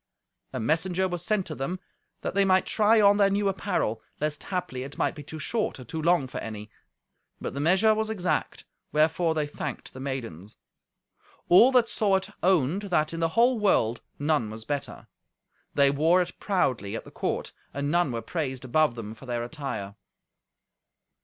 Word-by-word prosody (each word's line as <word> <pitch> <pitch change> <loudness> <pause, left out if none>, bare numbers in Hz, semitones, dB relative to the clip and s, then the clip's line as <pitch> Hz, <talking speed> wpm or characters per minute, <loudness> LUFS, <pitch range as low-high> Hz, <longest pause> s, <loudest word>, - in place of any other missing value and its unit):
A - - -4
messenger 175 +9 +1
was 175 -2 -4
sent 205 -1 0
to 155 - -5
them, 155 +6 -3 0.4
that - - -3
they 200 +1 +3
might 190 -1 +3
try 220 +1 +4
on 205 -1 +6
their 200 -1 +5
new 200 +1 +1
apparel, 185 - -1 0.2
lest 150 0 -2
haply 170 -9 -3
it 140 +2 -8
might - - +1
be 150 - -9
too 155 +2 -8
short 215 - -1
or - - -8
too 160 +7 -5
long 170 -3 +3
for - - -6
any. 105 -1 -7 0.7
But - - -5
the 140 - -4
measure 185 +8 +4
was 220 0 -1
exact, 185 -5 -2 0.3
wherefore 160 +2 +2
they 155 -1 +1
thanked 145 -1 -6
the 130 - -9
maidens. 115 - -6 0.9
All 225 +9 +8
that 245 -2 +5
saw 205 -4 +2
it 190 - -2
owned 180 -1 +2
that, 155 -3 +1
in 165 - -4
the 165 0 +1
whole 240 0 +4
world, 120 - +2 0.2
none 145 -6 +1
was 110 +1 -8
better. 145 -2 -4 0.7
They 140 -1 +5
wore 160 +6 +3
it 180 -1 -3
proudly 125 - 0
at - - -6
the - - -12
court, - - -3 0.2
and 140 +1 -2
none 175 -4 +2
were 115 -1 -4
praised 130 -7 -3
above 130 0 +2
them 110 -2 -6
for 125 +4 -13
their 120 -1 -2
attire. 120 -8 -5
155 Hz, 185 wpm, -27 LUFS, 130-190 Hz, 0.9 s, All